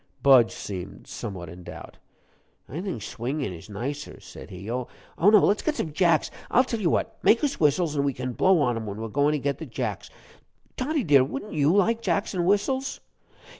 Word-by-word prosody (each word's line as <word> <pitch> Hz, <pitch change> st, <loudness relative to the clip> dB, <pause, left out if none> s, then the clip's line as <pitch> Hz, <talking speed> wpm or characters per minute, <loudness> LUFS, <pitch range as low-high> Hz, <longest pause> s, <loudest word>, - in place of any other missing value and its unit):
Budge 130 Hz, -4 st, +7 dB
seemed 95 Hz, -3 st, -7 dB
somewhat 90 Hz, -3 st, -6 dB
in 85 Hz, +3 st, -10 dB
doubt. -, -, -10 dB, 0.7 s
"I 155 Hz, +7 st, -5 dB
think 185 Hz, -, -4 dB
swingin' 130 Hz, -1 st, -3 dB
is 85 Hz, +4 st, -11 dB
nicer," 130 Hz, +8 st, -5 dB
said -, -, -12 dB
he 95 Hz, +2 st, -9 dB
"oh, 125 Hz, 0 st, -2 dB, 0.3 s
no; 190 Hz, -, +6 dB
let's 210 Hz, -1 st, +5 dB
get 310 Hz, -, -1 dB
some 155 Hz, -, -3 dB
jacks 170 Hz, 0 st, +2 dB, 0.2 s
I'll 255 Hz, -, +5 dB
tell 235 Hz, -3 st, -3 dB
you 180 Hz, -5 st, +1 dB
what! -, -, -1 dB
make 235 Hz, -, +4 dB
us 285 Hz, -2 st, 0 dB
whistles, 155 Hz, +1 st, +2 dB
an' 140 Hz, -, +1 dB
we 140 Hz, -1 st, 0 dB
can 125 Hz, 0 st, -4 dB
blow 185 Hz, +4 st, +4 dB
on 120 Hz, -4 st, +2 dB
'em 110 Hz, -1 st, -5 dB
while 100 Hz, -, -4 dB
we're 110 Hz, +1 st, -5 dB
goin' 145 Hz, +5 st, +2 dB
to -, -, +1 dB
get 140 Hz, 0 st, -2 dB
the 160 Hz, -, -6 dB
jacks. 115 Hz, -, -4 dB, 0.7 s
Toddie, 290 Hz, +2 st, -1 dB
dear, 145 Hz, -5 st, +5 dB
wouldn't 135 Hz, +9 st, -5 dB
you 150 Hz, -1 st, +3 dB
like 220 Hz, +4 st, +2 dB
jacks 200 Hz, -2 st, 0 dB
and 175 Hz, -2 st, 0 dB
whistles?" 260 Hz, +7 st, +1 dB
145 Hz, 205 wpm, -26 LUFS, 120-200 Hz, 0.7 s, Budge